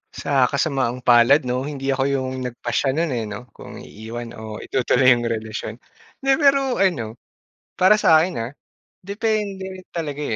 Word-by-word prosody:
Sa 135 -3 +2
kasamaang 130 -4 -1
palad 125 +5 +5
'no, 125 +2 -2
hindi 140 -2 -3
ako 135 0 0
yung 130 -2 -1
nagpasya 120 +3 -2
no'n, 165 -2 0
eh 115 -3 -2
'no, 115 +4 -9
kung - - -12
iiwan 115 +2 -8
o 110 -1 -7
itutuloy 130 0 +3
yung 120 -1 +2
relasyon. 110 -1 -4 0.5
'Di, 270 - +3
pero 275 -4 +3
ano, 125 - 0 0.6
para 190 +4 +4
sa'kin 165 - +3
ah, 115 +3 -4 0.5
depende 200 -3 -3
talaga, 150 -4 -4
135 Hz, 145 wpm, -21 LUFS, 120-175 Hz, 0.6 s, palad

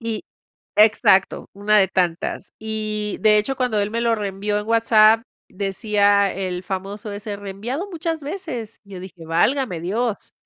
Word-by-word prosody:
y 230 +2 -3 0.5
exacto, 210 -3 +4
una 210 +1 +3
de 190 - +4
tantas. 175 -2 -1
Y, 215 -1 -3
de 215 -1 +5
hecho, 265 +6 -1
cuando 245 -5 0
él 205 +1 -1
me 230 - -2
lo 235 -1 +2
reenvió 205 0 -2
en 210 - -5
WhatsApp, 225 -1 +5 0.3
decía 200 0 +1
el 185 -1 -3
famoso 200 +3 -5
ese 205 0 -5
"reenviado 210 - -5
muchas 330 -2 -3
veces". 280 - -6
Yo 195 -2 -9
dije: 180 -3 -11
"Válgame 180 - +1
Dios. 215 +5 -2
210 Hz, 150 wpm, -21 LUFS, 195-230 Hz, 0.5 s, de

